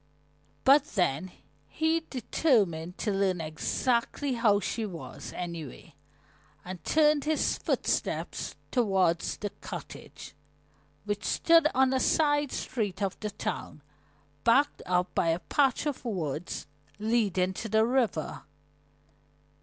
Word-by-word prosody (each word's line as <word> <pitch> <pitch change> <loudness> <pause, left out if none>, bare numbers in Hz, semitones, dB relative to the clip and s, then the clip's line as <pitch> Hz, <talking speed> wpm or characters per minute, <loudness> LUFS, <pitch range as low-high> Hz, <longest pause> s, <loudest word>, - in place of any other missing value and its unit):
But 275 +2 +7
then 180 -2 +1 0.4
he 320 +1 +1
determined 200 - +1
to 215 - -1
learn 195 -2 +1
exactly 235 - -1
how 225 -4 +3
she 225 +2 -2
was, 180 -6 -7
anyway, 165 -3 -7 0.7
and 180 -2 -7
turned 300 -2 +3
his 310 0 +1
footsteps - - -1 0.2
toward 190 -8 +2
the 205 +2 -4
cottage, - - -9 0.7
which 205 -1 -2
stood 330 -2 +4
on 265 0 +4
a 260 - +2
side 290 -1 +2
street 210 -7 -3
of 195 - -1
the 210 - -3
town, 205 - -5 0.6
backed 265 +5 +3
up 180 0 +1
by - - +1
a 165 0 +2
patch 265 - +1
of 290 -5 -3
woods 175 - -3 0.3
leading 205 -4 +1
to 220 +4 -5
the 220 +1 +4
river. 245 -1 0
215 Hz, 115 wpm, -29 LUFS, 180-265 Hz, 0.7 s, But